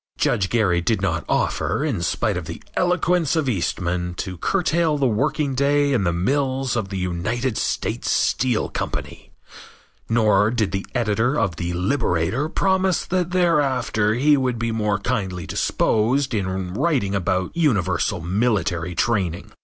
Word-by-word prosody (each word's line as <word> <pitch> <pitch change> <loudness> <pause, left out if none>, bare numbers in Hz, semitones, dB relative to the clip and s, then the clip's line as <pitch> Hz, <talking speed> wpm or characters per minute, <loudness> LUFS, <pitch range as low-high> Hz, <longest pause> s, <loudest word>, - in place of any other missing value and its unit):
Judge 95 -2 +1
Gary 95 -7 +2
did 110 +4 +1
not 85 -4 -1
offer, - - 0
in - - -1
spite - - 0
of - - -4
the - - -8
eloquence 180 -3 +1
of 155 -4 0
Eastman, 90 -4 -1
to 90 0 -5
curtail 165 - +1
the 140 - +1
working 135 +5 0
day 140 +1 +2
in 110 -7 +1
the 85 - +2
mills 130 +8 0
of 110 -5 -2
the 95 - -4
United 105 +8 -2
States - - -2
Steel 125 -3 +1
Company, - - -5 0.8
nor 110 -3 +3
did 110 -4 0
the 95 0 -3
editor 120 +4 +1
of 95 -7 -1
The 85 0 -3
Liberator 90 - 0
promise 190 0 +1
that 180 -1 -1
thereafter 145 - +1
he 145 +4 +4
would 130 -3 0
be 115 0 -2
more 105 -2 0
kindly 95 -6 -3
disposed 125 +5 +1
in 95 -3 -2
writing 130 - 0
about 95 - -1
universal 115 - +1
military 90 -3 0
training. 95 -6 -1
110 Hz, 145 wpm, -22 LUFS, 95-140 Hz, 0.8 s, he